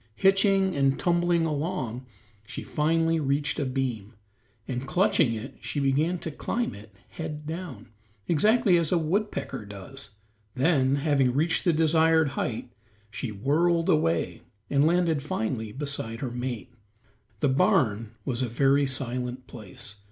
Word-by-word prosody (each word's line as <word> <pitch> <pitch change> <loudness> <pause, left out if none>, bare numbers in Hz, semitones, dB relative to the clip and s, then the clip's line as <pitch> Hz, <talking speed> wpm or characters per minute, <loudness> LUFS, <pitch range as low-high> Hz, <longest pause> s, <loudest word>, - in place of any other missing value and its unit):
Hitching 195 -1 +3
and 135 -1 +2
tumbling 175 -1 +2
along 145 -6 -3 0.4
she 115 +3 -7
finally 165 +2 +1
reached 145 0 0
a 140 - 0
beam, 125 -5 -3 0.5
and 130 0 -4
clutching 150 - +2
it 110 +6 -7
she 145 - -3
began 145 +6 +1
to 165 - -5
climb 235 +10 -2
it 105 +2 -12 0.2
head 150 -2 -6
downward, 165 -6 -7 0.4
exactly 210 - +4
as 165 -2 0
a 180 - +4
woodpecker 165 - -2
does. 105 +4 -6 0.4
Then, 135 -1 +3
having 140 -3 +2
reached 165 +6 +1
the 175 - +5
desired 160 -1 +4
height, 125 -4 -3 0.4
she 120 -1 -4
whirled 165 - +1
away, 85 - +1 0.3
and 140 +2 +4
landed 170 -3 +2
finally 110 -5 -3
beside 130 -3 -4
her 130 -3 -3
mate. 125 0 -5 0.7
The 145 - +3
barn 115 -4 +2
was 130 -2 -1
a 125 - -1
very 140 +4 +3
silent 125 -1 -3
place. 105 -2 -6
140 Hz, 135 wpm, -27 LUFS, 125-165 Hz, 0.7 s, the